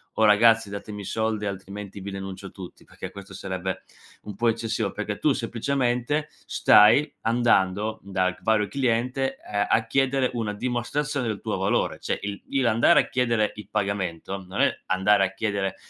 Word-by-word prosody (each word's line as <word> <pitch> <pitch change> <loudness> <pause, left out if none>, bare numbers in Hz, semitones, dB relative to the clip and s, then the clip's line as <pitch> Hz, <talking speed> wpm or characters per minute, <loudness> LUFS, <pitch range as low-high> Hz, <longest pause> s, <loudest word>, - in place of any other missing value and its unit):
"Oh 110 - +3
ragazzi, 110 +1 +5
datemi 100 +1 -7
i - - -7
soldi 110 -1 -1
altrimenti 100 +1 -7
vi 100 +1 -6
denuncio 95 0 -7
tutti", 95 -3 -11
perché - - -9
questo 100 0 -11
sarebbe 95 -1 -4 0.4
un 105 -2 -8
po' 115 +2 +2
eccessivo, 110 -3 -1
perché 105 -1 -4
tu 150 - +2
semplicemente, 125 +4 -1 0.2
stai 140 +9 +5
andando, 110 -3 +1
dal 95 -1 0
g - - -20
vario 110 -2 +2
cliente, 130 +3 0
uhm, 100 0 +1
a 110 0 +2
chiedere 135 -1 +1
una 110 -3 -2
dimostrazione 125 +4 -2
del 105 -3 -3
tuo - - -2
valore. - - 0
Cioè, - - -2
il 100 0 -5 0.2
l - - +1
andare 115 +9 +5
a - - 0
chiedere 115 -4 +1
il 105 -2 -10
pagamento, 95 -2 -3
non 95 - -2
è - - +4 0.2
andare 95 +1 +3
a 95 - -5
chiedere 100 -2 -2
105 Hz, 170 wpm, -25 LUFS, 100-120 Hz, 0.4 s, ragazzi